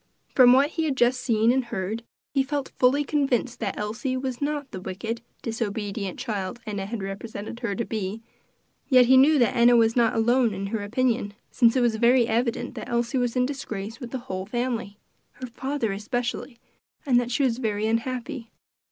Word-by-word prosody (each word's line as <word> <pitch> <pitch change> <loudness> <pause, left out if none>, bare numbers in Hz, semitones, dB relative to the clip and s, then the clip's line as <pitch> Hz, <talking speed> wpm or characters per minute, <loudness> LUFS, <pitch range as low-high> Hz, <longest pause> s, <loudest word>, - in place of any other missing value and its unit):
From 250 -2 +7
what 275 +4 +4
he 325 -1 -1
had 280 -4 -1
just 245 +1 +3
seen 225 -1 +3
and 260 0 +1
heard, 220 -1 -3 0.3
he 275 - +3
felt 280 0 -2
fully 265 +3 +4
convinced 270 -4 0
that - - -3
Elsie 225 +5 -2
was 260 -1 -4
not 290 -2 -2
the 185 - -6
wicked, 220 +6 -5 0.2
disobedient 205 -4 -3
child 210 -4 -4
Enna 200 -3 -4
had 215 -2 -4
represented 205 +3 -6
her 230 -5 -2
to 235 - -2
be; 215 0 -4 0.7
yet 255 -3 +7
he 260 +2 +6
knew 290 +4 +6
that 240 -3 +2
Enna 240 0 +6
was 225 -1 +4
not 235 -2 +3
alone 235 -1 +2
in 195 +1 -4
her 210 +1 -3
opinion, 225 -1 0 0.2
since 235 -1 +4
it 255 - +3
was 235 -2 +2
very 240 +1 +4
evident 235 +1 -1
that - - -7
Elsie 235 +2 0
was 245 -1 -1
in 250 0 +3
disgrace 225 -5 -5
with 245 -4 -7
the 260 - -3
whole 185 0 -4
family 235 -3 -3 0.4
her 255 - -7
father 255 -1 -3
especially 235 +4 -3 0.5
and 250 -4 +4
that 245 -1 -2
she 245 +3 0
was 250 -2 +1
very 215 -3 -1
unhappy. 235 +1 -2
235 Hz, 190 wpm, -25 LUFS, 220-255 Hz, 0.7 s, From